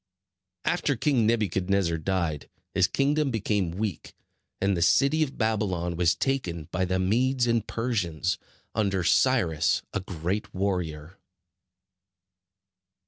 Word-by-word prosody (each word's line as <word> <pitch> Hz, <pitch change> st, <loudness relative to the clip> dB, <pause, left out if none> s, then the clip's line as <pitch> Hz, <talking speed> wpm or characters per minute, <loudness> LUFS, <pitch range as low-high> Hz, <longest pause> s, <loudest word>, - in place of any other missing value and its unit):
After 155 Hz, -5 st, +1 dB
King 120 Hz, -3 st, +2 dB
Nebuchadnezzar 95 Hz, -5 st, +1 dB
died, 85 Hz, -4 st, -2 dB, 0.2 s
his 95 Hz, 0 st, +3 dB
kingdom 145 Hz, +4 st, +1 dB
became 105 Hz, -5 st, 0 dB
weak, 95 Hz, 0 st, -4 dB, 0.4 s
and 95 Hz, 0 st, +1 dB
the 85 Hz, -, -2 dB
city 140 Hz, -, +4 dB
of 145 Hz, -3 st, -1 dB
Babylon 100 Hz, -6 st, 0 dB
was 85 Hz, 0 st, +3 dB
taken 95 Hz, -, -1 dB
by 95 Hz, 0 st, 0 dB
the 95 Hz, +1 st, 0 dB
Medes 120 Hz, +7 st, +2 dB
and 115 Hz, -3 st, +1 dB
Persians, 95 Hz, -6 st, -1 dB, 0.3 s
under 100 Hz, -4 st, 0 dB
Cyrus, 90 Hz, -, +2 dB
a 105 Hz, -, 0 dB
great 95 Hz, +2 st, -4 dB
warrior. 90 Hz, -3 st, -3 dB
95 Hz, 115 wpm, -27 LUFS, 90-115 Hz, 0.4 s, city